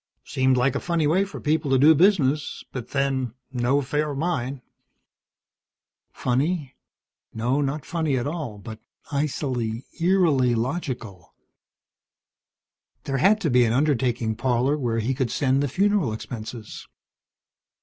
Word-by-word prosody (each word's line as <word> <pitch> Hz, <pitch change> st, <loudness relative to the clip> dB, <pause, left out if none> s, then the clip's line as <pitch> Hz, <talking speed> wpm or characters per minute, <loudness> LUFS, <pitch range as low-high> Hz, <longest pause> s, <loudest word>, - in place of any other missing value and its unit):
Seemed 130 Hz, 0 st, +2 dB
like 125 Hz, +1 st, +2 dB
a 140 Hz, -, -1 dB
funny 170 Hz, -3 st, 0 dB
way 180 Hz, +7 st, +3 dB
for 195 Hz, -, -8 dB
people 150 Hz, -1 st, 0 dB
to 135 Hz, -, +4 dB
do 150 Hz, +5 st, +7 dB
business, 155 Hz, -4 st, +2 dB
but 125 Hz, -3 st, -6 dB
then, 135 Hz, -4 st, -1 dB, 0.2 s
no 125 Hz, +2 st, +1 dB
affair 150 Hz, +2 st, -1 dB
of 140 Hz, -, -4 dB
mine." 140 Hz, -5 st, -2 dB, 1.5 s
Funny? 140 Hz, +3 st, -1 dB, 0.6 s
No, 125 Hz, +6 st, 0 dB
not 145 Hz, +1 st, -2 dB
funny 160 Hz, -5 st, -1 dB
at 120 Hz, -, -2 dB
all, 145 Hz, -8 st, -4 dB
but 110 Hz, +2 st, -9 dB, 0.3 s
icily, 130 Hz, -5 st, -2 dB
eerily 165 Hz, -9 st, +3 dB
logical. 115 Hz, -, -4 dB, 1.7 s
There 135 Hz, -1 st, -2 dB
had 200 Hz, +10 st, +4 dB
to 160 Hz, -, 0 dB
be 125 Hz, 0 st, +5 dB
an 115 Hz, -1 st, +1 dB
undertaking 125 Hz, -5 st, +1 dB
parlor 130 Hz, +4 st, +1 dB
where 120 Hz, -6 st, -1 dB
he 115 Hz, +4 st, 0 dB
could 130 Hz, -2 st, -1 dB
send 135 Hz, +2 st, +1 dB
the 145 Hz, -, +1 dB
funeral 190 Hz, -, +1 dB
expenses. 110 Hz, 0 st, -8 dB
135 Hz, 135 wpm, -24 LUFS, 120-150 Hz, 1.7 s, do